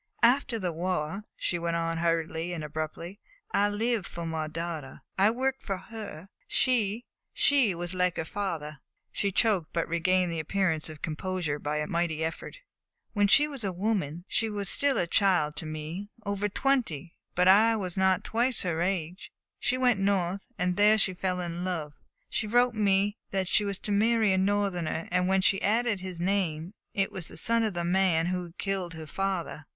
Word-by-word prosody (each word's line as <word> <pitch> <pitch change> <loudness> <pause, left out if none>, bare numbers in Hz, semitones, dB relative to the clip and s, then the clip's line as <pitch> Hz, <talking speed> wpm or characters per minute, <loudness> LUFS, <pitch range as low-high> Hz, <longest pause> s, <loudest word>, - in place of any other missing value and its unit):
"After 245 0 +4
the 185 -5 -2
war," 180 +3 -2
she 175 - -1
went 170 0 -1
on 165 0 -1
hurriedly 165 0 0
and 165 -3 -4
abruptly, 155 +5 -5 0.3
"I 205 +1 +3
lived 220 -1 0
for 170 -1 -6
my 160 -1 -2
daughter. 160 -3 -6
I 195 +2 +5
worked 265 +3 -1
for 195 -2 -2
her. 205 -5 -9 0.2
She 235 -2 +1 0.3
she 265 -10 +4
was 175 +1 -5
like 180 -1 +1
her 160 - -2
father." 160 -6 -4 0.3
She 200 - 0
choked, 195 -5 +2
but 170 -1 0
regained 180 +1 +2
the 165 - -2
appearance 160 -1 0
of 155 -1 -11
composure 160 -2 -2
by 150 +1 -2
a 150 - -1
mighty 165 -1 -1
effort. 165 - -5 0.6
"When 205 -2 +3
she 295 +9 +6
was 275 -6 -7
a 195 - -1
woman 180 -4 -2
she 225 - 0
was 200 -3 -4
still 280 -1 +2
a - - +2
child 175 -5 +2
to 160 - -3
me; 155 +6 -5 0.2
over 200 0 -1
twenty, 205 - 0 0.2
but 180 +1 +3
I 220 +4 +6
was 185 -5 -4
not 190 -1 +2
twice 240 +3 0
her 170 -3 -1
age 180 -1 -2 0.3
she 255 - +1
went 250 -5 +3
North, 195 +1 0
and 180 0 0
there 210 +1 +6
she 195 -3 +3
fell 185 0 -2
in 175 0 -4
love. 165 -5 -3 0.3
She 220 - -2
wrote 245 +2 +3
me 205 -1 +2
that 190 -1 -1
she 210 - +5
was 200 -2 -2
to 210 - -2
marry 220 0 +3
a - - +2
Northerner, 190 -5 0
and 180 0 +2
when 190 0 +3
she 195 +1 +3
added 225 0 +1
his 185 -2 -7
name 175 -2 -1 0.2
it 195 -1 +1
was 185 -4 -3
the - - -5
son 230 0 +3
of 215 -4 -1
the 170 0 -1
man 175 -2 +3
who 180 -1 -3
killed 190 -4 -2
her 160 -1 -7
father." 175 -4 -3
185 Hz, 190 wpm, -28 LUFS, 165-205 Hz, 0.6 s, she